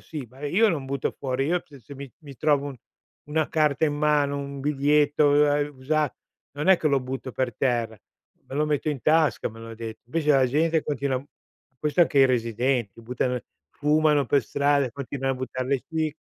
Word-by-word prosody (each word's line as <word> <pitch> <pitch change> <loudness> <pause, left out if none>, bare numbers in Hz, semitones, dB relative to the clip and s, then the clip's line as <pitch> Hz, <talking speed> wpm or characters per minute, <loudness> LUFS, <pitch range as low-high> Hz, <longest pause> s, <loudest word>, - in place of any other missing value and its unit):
sì, 150 -6 -7
ma, 130 - -17
ehm, 145 +2 -4
io 225 +3 +5
non 155 -8 -1
butto 135 0 -2
fuori 135 0 -1
io 175 +2 0
se 140 -3 -15
se 140 +6 -12
mi 135 -1 -9
mi 140 -4 -12
trovo 145 0 +2
un 135 - -8 0.5
una 155 0 +1
carta 155 -1 +1
in 150 - +1
mano, 145 -1 +1
un 140 0 -6
biglietto, 145 +1 +2
uhm, 145 +1 +5
a 145 0 0
usa 145 +2 -1 0.4
non 150 +5 -3
è 190 -2 +7
che 155 - +1
lo 140 -1 +3
butto 130 0 -5
per 125 -2 -2
terra, 120 -3 0 0.5
me - - -8
lo 150 +2 +1
metto 150 0 -1
in 145 -4 -3
tasca, 155 -9 +2
me 115 +1 -13
lo 115 - -9
ha - - -8
de 110 -1 -7
invece 150 +5 0
la 135 -3 +5
gente 160 +4 +1
continua 140 -2 -2 0.6
questo 150 +3 0
anche 155 -4 +4
i - - +8
residenti, 120 -2 -1
buttano 125 +1 -1 0.3
fumano 150 -1 +2
per 140 +1 +2
strada, 140 +3 +1
e 120 - -8
continuan 135 -1 -3
a - - -3
buttar 130 0 -4
le 135 -1 0
ci 160 -2 -1
140 Hz, 210 wpm, -25 LUFS, 130-150 Hz, 0.6 s, i